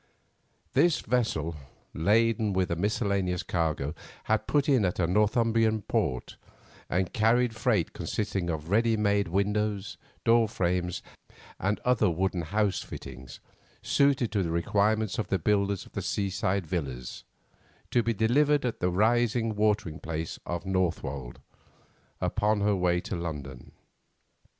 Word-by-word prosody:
This 170 -3 +3
vessel, 85 -10 -1 0.4
laden 110 +4 +2
with 95 -1 0
a - - +1
miscellaneous 100 -1 0
cargo, 80 -4 -1 0.3
had 110 0 0
put 145 0 +2
in 130 -7 +4
at 90 -2 0
a 90 - +2
Northumbrian 110 +3 +2
port, 65 -7 -2 0.5
and 90 0 0
carried 115 +2 +2
freight 110 -7 +1
consisting 95 -4 -2
of 80 +1 -4
ready 115 +1 +3
made 100 -2 +2
windows, 100 -1 -1 0.3
door 115 -1 +5
frames, 90 -3 -1 0.6
and 100 +2 0
other 120 -5 +3
wooden 90 +1 -1
house 100 +4 0
fittings 65 -2 -9 0.4
suited 140 -4 +2
to 105 - +1
the 85 - -1
requirements 105 +5 +1
of 110 - -1
the 95 - +1
builders 100 +2 0
of - - -6
seaside 95 -1 -1
villas, 70 -7 -4 0.7
to 120 - +3
be 115 - 0
delivered 140 +7 +2
at 120 - -2
the 90 - +1
rising 115 +3 +2
watering 105 -6 0
place 80 -1 -4
of 85 +2 -3
Northwold, 80 -9 -2 0.8
upon 105 0 +1
her 105 0 +2
way 90 -1 +2
to - - -4
London. 75 -7 -6
100 Hz, 130 wpm, -28 LUFS, 85-110 Hz, 0.8 s, door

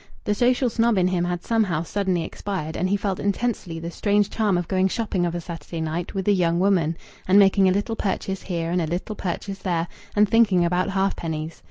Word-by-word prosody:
The 210 - +1
social 250 +4 +2
snob 230 -1 +2
in 180 -1 +3
him 175 -1 0
had 175 0 -3
somehow 200 -9 +1
suddenly 185 -1 -1
expired, 170 -6 -5
and 185 - 0
he 200 - +2
felt 195 -2 -2
intensely 200 -4 -2
the 170 +1 -5
strange 205 +2 +1
charm 210 -5 +1
of 175 -2 -2
going 190 0 +2
shopping 190 -4 -1
of 170 - -3
a 175 - -3
Saturday 170 0 -7
night 160 +4 -3
with 190 0 -2
a - - +5
young 170 -2 +2
woman, 175 -4 +2 0.3
and 190 +2 +5
making 195 -1 +5
a - - +3
little 205 +4 -1
purchase 195 -2 -2
here 170 -3 -3
and 180 0 +1
a 160 - -1
little 180 +6 -3
purchase 195 +1 -4
there, 170 -3 -1 0.3
and 210 0 +5
thinking 205 -6 +4
about 180 +1 +1
halfpennies. 165 -5 -2
185 Hz, 215 wpm, -23 LUFS, 170-205 Hz, 0.3 s, a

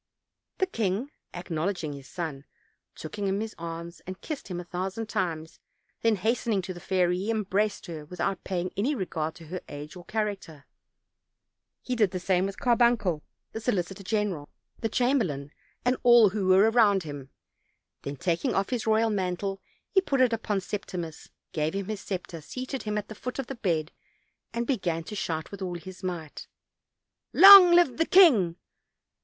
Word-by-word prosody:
The 375 - +2
king, 225 - -2 0.2
acknowledging 170 -2 -3
his 140 -1 -10
son, 155 -5 -5 0.5
took 160 +6 -8
him 200 - 0
in 195 +1 0
his 220 0 -4
arms 170 +1 -7
and 185 0 -6
kissed 310 -3 -6
him 180 -2 -4
a - - -5
thousand 190 +5 -4
times; 160 -4 -3 0.4
then 225 -1 +3
hastening 220 0 0
to 185 0 -5
the 175 - -10
fairy, 180 -1 +1
he 200 +4 -3
embraced 210 -1 0
her 160 -4 -7
without 180 +4 -3
paying 180 -1 -2
any 260 +9 0
regard 160 - -3
to 165 - -12
her 180 +3 -6
age 145 +4 -8
or 180 - -10
character; 200 -10 -4 1.2
he 250 - -2
did 215 -5 +3
the 185 0 -4
same 185 +1 +1
with 195 - -7
Carbuncle, 235 -9 +2 0.3
the 225 - -6
solicitor 195 -4 -2
general, 195 -6 -2 0.3
the 225 - -1
chamberlain 210 - 0 0.3
and 250 +1 +3
all 240 -3 +7
who 195 -2 -1
were 195 +4 +5
around 205 -5 +4
him; 145 -3 -8 0.7
then, 140 - -5
taking 170 +4 -1
off 195 +4 0
his 240 -3 -2
royal 220 +1 +3
mantle, 195 0 -2 0.3
he 385 - +4
put 275 -8 -1
it 255 -2 +4
tpon 215 -3 -1
Septimus, 180 -5 -6 0.2
gave 155 +2 -1
him 200 -1 -2
his 210 0 -5
scepter, 180 -4 -5
seated 255 - -5
him 210 -1 -2
at 210 0 -3
the - - -8
foot 250 +4 -6
of 270 - -2
the 270 - -6
bed, 170 - -1 0.6
and 235 +1 -2
began 175 -10 -1
to 210 - -8
shout 160 -5 -3
with 200 -1 -9
all 180 -2 -3
his 185 +2 -11
might: 175 -5 -5 0.9
"Long 390 -1 +11
live 345 -7 +4
the 325 - +1
king!" 240 - +6
195 Hz, 175 wpm, -27 LUFS, 170-225 Hz, 1.2 s, Long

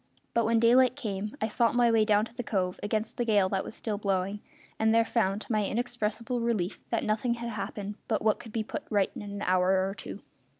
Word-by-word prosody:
But 230 -1 +2
when 230 0 +3
daylight 250 +2 +5
came 210 -2 -4
I 220 - +1
fought 230 +1 +1
my 240 -1 +4
way 220 -1 +4
down 210 0 +3
to 230 - -14
the 245 - -4
cove, 185 -6 -1
against 220 +2 -2
the 240 - +1
gale 205 -5 +3
that 195 -1 0
was - - -8
still 210 -3 -3
blowing, 195 0 -1 0.4
and 220 0 +3
there 230 0 +5
found, 210 -3 0
to - - -7
my 215 -2 +2
inexpressible 235 +1 -2
relief, 220 -6 -1
that 230 - 0
nothing 225 +3 0
had 235 0 -5
happened 205 0 -5
but 220 - 0
what 215 -1 +2
could 225 - -10
be 220 0 -1
put - - -5
right 200 -3 +2
in - - -6
an 205 -1 -6
hour 185 +1 +3
or 195 - -3
two. - - -8
215 Hz, 230 wpm, -29 LUFS, 200-230 Hz, 0.4 s, daylight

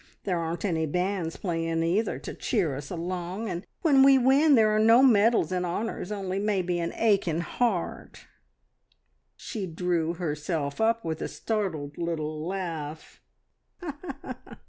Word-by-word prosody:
There 180 -3 0
aren't 165 +2 -3
any 160 -4 0
bands 180 +1 -1
playing, 165 -2 -1
either, 185 +7 +1
to - - -7
cheer 180 - 0
us 140 +1 -7
along, 180 +4 -4
and 180 -2 -4 0.2
when 285 -5 +5
we 270 0 +7
win 275 +4 +5
there 215 -2 +4
are - - +3
no 225 +4 +6
medals 225 -7 +4
and 180 -1 0
honours, 180 +2 -3
only 195 -2 -2
maybe 185 -4 0
an 170 0 -2
aching 195 -7 +2
heart!" 200 -1 -2 1.1
She 205 -4 -5
drew 170 -1 -1
herself 150 -1 -3
up 230 -1 +2
with 160 -1 -3
a - - -1
startled 165 -10 -3
little 155 -2 -3
laugh. 165 -5 -5
180 Hz, 140 wpm, -27 LUFS, 165-215 Hz, 1.1 s, we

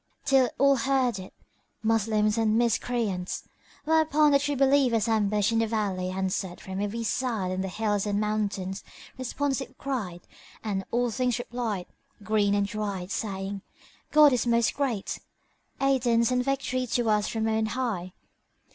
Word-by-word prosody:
till 270 -2 +4
all 275 0 +4
heard 255 -4 +1
it, 185 - -9 0.5
Moslems 215 -1 +2
and 225 -1 +2
Miscreants. 230 -5 -1 0.4
Whereupon 310 -1 +4
the 280 - +5
True 290 0 -1
Believers 265 -5 +3
ambushed 210 -1 +2
in 225 - +2
the 225 - +2
valley 200 -5 -1
answered 190 -1 -2
from 190 +1 -5
every 215 +3 -2
side 225 -5 -1
and 185 +1 -2
the - - -2
hills 205 +1 -1
and 205 0 0
mountains 205 -2 -2 0.3
responsive 270 +1 -3
cried 210 -11 -4 0.4
and 200 -3 -2
all 240 0 +1
things 250 0 0
replied, 235 -6 -3 0.4
green 205 -1 +2
and 200 0 +2
dried, 200 -3 -4
saying, 195 -2 -3 0.5
"God 300 -2 +7
is 245 -1 0
Most 235 -1 +3
Great! 250 -8 -2 0.6
Aidance 250 -4 +2
and 250 0 +2
Victory 255 -1 -1
to 240 0 0
us 210 -1 +2
from 220 -1 -1
on 220 0 +1
High! 215 -8 -3
225 Hz, 145 wpm, -27 LUFS, 200-255 Hz, 0.6 s, God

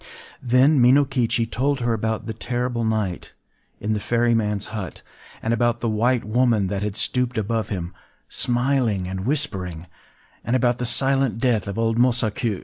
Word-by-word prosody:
” - - -20
Then 130 +3 +4
Minokichi 125 -2 +3
told 135 +4 -1
her 120 -1 +1
about 110 0 -2
the 110 - -4
terrible 120 +1 -2
night 110 -5 -2 0.5
in 110 +1 -1
the 105 - -1
ferryman’s 115 -3 0
hut,—and 110 +2 -6
about 120 0 +1
the 115 - 0
White 115 +2 +1
Woman 110 -3 +2
that 100 0 -2
had 105 -1 -3
stooped 125 0 0
above 110 0 -1
him, 90 -3 -4 0.3
smiling 120 -6 0
and 95 +3 -4
whispering,—and 95 - -4
about 125 -1 +1
the 125 - -1
silent 135 -2 +2
death 115 -5 +1
of 100 - -5
old 115 0 +1
Mosaku. 115 -3 +1
115 Hz, 150 wpm, -23 LUFS, 105-125 Hz, 0.5 s, Then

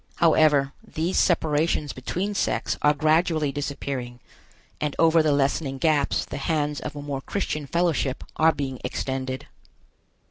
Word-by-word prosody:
However, 155 -4 +4
these 165 +4 -1
separations 155 -3 +1
between 180 +10 -3
sects 195 - 0
are 150 0 +4
gradually 155 0 +2
disappearing, 135 -3 -4 0.6
and 150 -2 -2
over 165 0 +5
the 155 -1 +2
lessening 140 0 0
gaps 150 -1 +1
the - - -6
hands 150 0 -1
of 150 -1 -6
a 145 - -6
more 140 -2 -4
Christian 155 -4 -3
fellowship 165 -5 0
are 160 +1 +5
being 135 -4 -4
extended. 130 +1 -3
150 Hz, 135 wpm, -25 LUFS, 135-160 Hz, 0.6 s, over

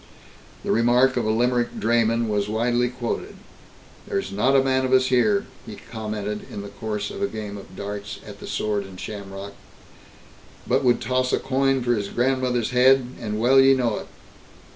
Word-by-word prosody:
The - - -1
remark 125 +3 +4
of 120 - 0
a - - 0
Limerick 120 +2 +1
drayman 115 0 +2
was 105 -1 -1
widely 120 +2 +1
quoted. 125 -2 -4 0.7
"There's - - -2
not 125 +8 +2
a 135 - +5
man 130 0 +1
of 130 0 0
us 130 0 +5
here," 200 - +3 0.2
he 110 - -9
commented 105 -1 -6
in 100 - -6
the 100 - -8
course 105 0 -4
of 200 - -7
a 200 - +2
game 105 - -6
of 100 -2 -11
darts 100 +1 -6
at - - -10
the - - -9
Sword 105 -1 -1
and 95 -1 -11
Shamrock, 100 -1 -7 1.1
"but 135 - +1
would 125 -2 +3
toss 130 +2 0
a - - +4
coin 135 -1 +1
for 120 0 +2
his 105 -3 -2
grandmother's 125 0 0
head, 125 0 +4
and 105 -3 -3
well 130 +4 +5
ye 135 0 +6
know 120 -5 0
it. - - -10
120 Hz, 185 wpm, -23 LUFS, 105-130 Hz, 1.1 s, ye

